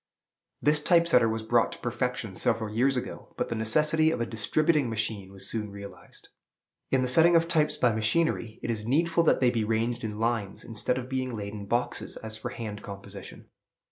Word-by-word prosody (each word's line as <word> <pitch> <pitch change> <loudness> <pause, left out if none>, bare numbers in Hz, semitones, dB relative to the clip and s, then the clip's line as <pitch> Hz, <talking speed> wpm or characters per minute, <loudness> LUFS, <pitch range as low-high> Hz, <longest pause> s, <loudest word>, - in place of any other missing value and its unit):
This 150 0 +4
Type 170 +2 +4
setter 125 -8 +4
was 110 0 -3
brought 115 +1 +2
to - - -9
perfection 120 -3 -3
several 105 +3 0
years 130 +3 +3
ago; 125 - -7
but - - -2
the 115 - -2
necessity 150 +8 +3
of 160 - -1
a 120 - 0
distributing 145 +5 +1
machine 105 -3 -3
was 95 -1 -6
soon 105 -2 -2
realized. 100 0 -12 0.6
In 130 -1 +2
the - - 0
setting 165 +6 +5
of 165 0 +4
types 155 -3 +1
by 125 -5 +3
machinery, 110 0 0
it 120 - -1
is 110 -2 -4
needful 165 +8 +2
that - - +3
they 125 -1 +4
be 115 -3 0
ranged 115 +2 -1
in 105 -1 -4
lines, 115 -3 -2
instead 115 +2 -2
of 125 -1 -5
being 130 -2 -3
laid 100 0 -5
in 100 -2 -7
boxes, 120 +3 -2
as 110 -1 -7
for 110 +3 -5
hand 110 -4 -6
composition. 100 -1 -10
115 Hz, 200 wpm, -28 LUFS, 110-140 Hz, 0.6 s, setting